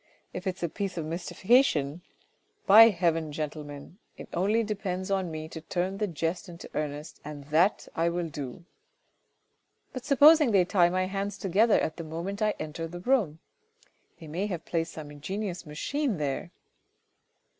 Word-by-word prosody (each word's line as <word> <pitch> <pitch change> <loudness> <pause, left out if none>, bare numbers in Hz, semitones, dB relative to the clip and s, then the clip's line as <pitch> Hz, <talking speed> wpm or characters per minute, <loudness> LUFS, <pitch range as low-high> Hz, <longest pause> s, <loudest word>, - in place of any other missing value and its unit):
If 180 +1 -5
it's 185 0 -3
a - - +2
piece 195 +2 -4
of 165 - -2
mystification, 170 - +1 0.6
by 225 +3 +9
heaven, 165 -5 0
gentlemen, 150 +2 -6 0.2
it - - -10
only 205 +6 +2
depends 195 -3 -3
on 190 -2 0
me 155 -1 -5
to 160 - -8
turn 185 +4 -2
the 210 - +1
jest 170 +3 -3
into 170 0 -10
earnest 150 0 -4
and 145 -1 -8
that 175 +7 +3
I 165 +1 +1
will 170 0 -2
do. 145 0 -7 0.6
" - - -46
But 255 -2 -6
supposing 295 0 +6
they 195 -4 +4
tie 175 -2 +4
my 185 +1 0
hands 200 +1 -3
together 205 +4 +3
at 155 - -2
the 165 - -5
moment 170 +6 -5
I 215 -1 +2
enter 155 +2 -5
the 175 +2 -8
room: 190 - +1 0.8
they 165 - -10
may 175 +7 -2
have 175 -5 -5
placed 165 -1 -2
some 150 -2 -8
ingenious 180 +4 -5
machine 245 - -2
there. 145 +3 -2
175 Hz, 165 wpm, -28 LUFS, 155-200 Hz, 0.8 s, by